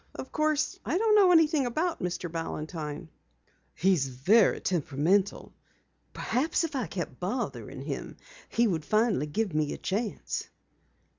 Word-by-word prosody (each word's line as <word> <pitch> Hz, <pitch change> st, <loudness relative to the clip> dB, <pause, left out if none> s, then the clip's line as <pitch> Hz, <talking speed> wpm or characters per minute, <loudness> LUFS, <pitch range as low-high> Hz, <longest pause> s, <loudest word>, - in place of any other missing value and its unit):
Of -, -, -7 dB
course, 305 Hz, -1 st, 0 dB
I -, -, 0 dB
don't 435 Hz, +1 st, +3 dB
know 400 Hz, -4 st, +6 dB
anything 315 Hz, -5 st, +4 dB
about 320 Hz, +8 st, -1 dB
Mr. 180 Hz, 0 st, -2 dB
Balantine." 160 Hz, -1 st, -5 dB, 0.7 s
"He's 175 Hz, -6 st, +2 dB
very 180 Hz, -, +3 dB
temperamental. 175 Hz, +4 st, 0 dB, 0.6 s
Perhaps 290 Hz, +7 st, 0 dB
if 320 Hz, -3 st, -3 dB
I 255 Hz, -6 st, -1 dB
kept 160 Hz, -8 st, -5 dB
bothering 220 Hz, +7 st, -4 dB
him -, -, -5 dB, 0.3 s
he 235 Hz, -, +2 dB
would 170 Hz, -8 st, 0 dB
finally 215 Hz, -, +1 dB
give 195 Hz, +4 st, -1 dB
me 155 Hz, -1 st, 0 dB
a -, -, -6 dB
chance." 210 Hz, +3 st, -3 dB
200 Hz, 135 wpm, -28 LUFS, -, 0.7 s, know